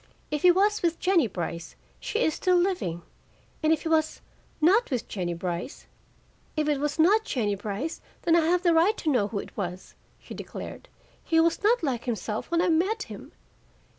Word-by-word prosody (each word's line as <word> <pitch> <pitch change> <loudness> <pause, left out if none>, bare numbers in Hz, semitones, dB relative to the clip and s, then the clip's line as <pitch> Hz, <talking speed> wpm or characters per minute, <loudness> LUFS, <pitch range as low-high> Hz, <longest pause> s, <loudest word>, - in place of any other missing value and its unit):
"If 300 -1 -1
he 360 - +6
was 410 +4 +3
with 335 -1 0
Jennie 360 -8 +3
Brice, 170 -3 -5 0.2
she 445 - -1
is 315 - +2
still 365 +3 +1
living, 350 - -1 0.6
and 310 - +2
if 320 - +1
he - - -3
was 315 -1 +1 0.4
not 380 +10 +4
with 250 -4 -2
Jennie 175 -4 -3
Brice 175 +6 -5 0.4
" - - -36
"If 305 -1 +1
it 295 -2 +1
was 295 0 -2
not 400 +7 +4
Jennie 220 - -1
Brice, 205 - -4 0.2
then 335 -2 +4
I - - +6
have 360 +2 +1
a 340 - +5
right 350 +7 +3
to 310 - 0
know 230 -7 +2
who 205 - -5
it - - -7
was," 180 -2 -5 0.3
she - - -11
declared. - - -8 0.3
"He 325 - +2
was 330 0 +2
not 440 0 +3
like 255 -6 -1
himself 220 -2 -3
when 340 0 +2
I 365 - +2
met 375 +7 +1
him. 210 -2 -10
315 Hz, 195 wpm, -27 LUFS, 210-355 Hz, 0.6 s, he